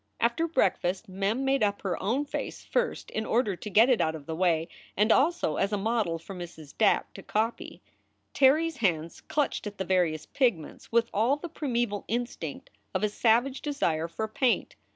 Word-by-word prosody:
After 240 +8 +1
breakfast, 195 - 0
Mem 200 +7 -1
made 270 0 +2
up 205 -1 0
her 185 -3 -2
own 245 +9 0
face 285 - -5
first - - -1
in 220 - -2
order 220 -3 +1
to 210 - -7
get 220 +4 +6
it 255 -4 +3
out 160 0 +1
of 150 -3 -9
the 160 - -4
way, 165 -2 +2 0.3
and 210 +3 +4
also 290 - +2
as 195 - +1
a 205 - +1
model 210 -5 0
for 165 +4 -10
Mrs. 170 -5 -9
Dack 220 - +2
to 195 - -9
copy. 220 +4 -2 0.5
Terry 285 +4 +5
s 330 -3 -4
hands 170 - -1
clutched 290 -7 -1
at 205 0 -7
the 190 - -3
various 175 -4 +1
pigments 235 - -1
with 230 0 +3
all 230 +7 +3
the 340 +4 -7
primeval 240 -9 -2
instinct 245 - -4 0.2
of - - 0
a 210 - +3
savage 240 +5 +2
desire 170 - 0
for 220 +6 -4
paint. 240 +3 0
215 Hz, 190 wpm, -28 LUFS, 185-255 Hz, 0.5 s, get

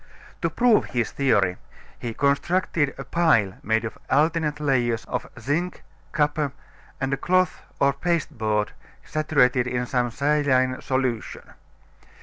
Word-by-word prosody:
To - - +1
prove 240 -3 +3
his 120 -3 -2
theory, 105 -10 +2 0.4
he 115 -2 -5
constructed 145 +1 +1
a - - -5
pile 115 - +2
made 110 +2 0
of 110 - -7
alternate 150 +1 +2
layers 120 -6 +1
of 125 - -4
zinc, 155 +9 -2 0.3
copper, 150 -2 0 0.5
and 135 0 -1
a - - 0
cloth 185 0 +1 0.2
or 140 0 +4
pasteboard 125 -10 -1 0.3
saturated 135 -5 +2
in 125 0 -1
some 125 0 0
saline 130 -1 +1
solution. 130 -4 -2
135 Hz, 125 wpm, -24 LUFS, 120-150 Hz, 0.5 s, or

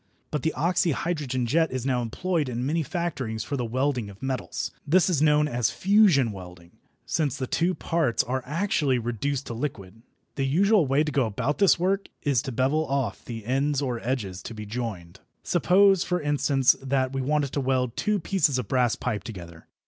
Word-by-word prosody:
But 150 - -1
the 160 - 0
oxyhydrogen 160 -6 0
jet 160 +6 +2
is 130 -1 -3
now 125 -2 +1
employed 155 +5 -1
in 120 +1 -3
many 160 +4 0
factories 140 - -3
for 140 - -4
the 125 - -2
welding 125 -1 -1
of 100 0 -13
metals. 130 -1 -3 0.2
This 185 +4 +4
is 150 -5 +1
known 150 -1 +4
as 120 -5 0
fusion 190 - +4
welding, 90 -3 -11 0.3
since 150 -5 -1
the 130 - -2
two 175 +7 0
parts 165 -8 0
are 130 +1 -2
actually 150 -3 0
reduced 125 +4 -2
to - - -5
liquid. 115 -5 -5 0.4
The 135 - 0
usual 190 +3 +3
way 135 +3 +3
to 155 - -3
go 135 -4 +1
about 130 +7 -2
this 200 -2 +5
work 190 +3 0 0.2
is 140 -5 +2
to 135 - -5
bevel 135 +6 +1
off 135 -2 -2
the 115 -3 -7
ends 135 +3 +1
or 125 -4 -2
edges 110 -7 -3
to 115 - -8
be 105 -1 -7
joined. 100 -6 -5 0.2
Suppose, 190 +2 +4
for 180 0 -1
instance, 140 -3 +2
that 135 -1 0
we 135 - -1
wanted 145 0 0
to 140 - -1
weld 130 -2 0
two 210 0 0
pieces 170 -6 +1
of 125 -5 -3
brass 125 -1 +2
pipe 110 -5 -3
together. 85 -7 -10
135 Hz, 190 wpm, -26 LUFS, 120-155 Hz, 0.4 s, this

